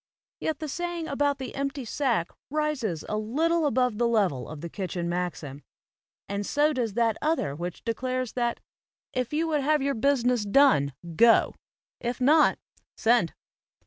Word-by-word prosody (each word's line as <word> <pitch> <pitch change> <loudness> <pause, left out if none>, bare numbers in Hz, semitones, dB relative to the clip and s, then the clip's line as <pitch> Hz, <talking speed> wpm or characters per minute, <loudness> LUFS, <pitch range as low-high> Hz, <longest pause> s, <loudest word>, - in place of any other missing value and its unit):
Yet 315 -2 -2
the 310 - -5
saying 345 +2 -3
about 285 -1 0
the 265 - -6
empty 275 -1 -3
sack 230 -8 0 0.2
rises 275 - -1
a 210 - -2
little 315 +9 +1
above 250 -4 +1
the 240 - +3
level 195 - +1
of 155 -2 -8
the 170 - -4
kitchen 180 -1 -4
maxim; 170 -5 -4 0.7
and 200 +1 -2
so 295 +8 +2
does 235 -6 -2
that 230 -2 +2
other 300 - 0
which 175 +2 -6
declares 255 +1 -2
that 240 -1 -1 0.5
"if 250 -2 -2
you 320 +2 0
would 300 -2 +1
have 300 0 +2
your 280 0 +1
business 250 -2 +2
done, 200 - +4 0.2
go; 235 -1 +5 0.5
if 240 +1 -3
not 295 +4 +5 0.4
send." 230 -7 +2
245 Hz, 155 wpm, -27 LUFS, 205-285 Hz, 0.7 s, go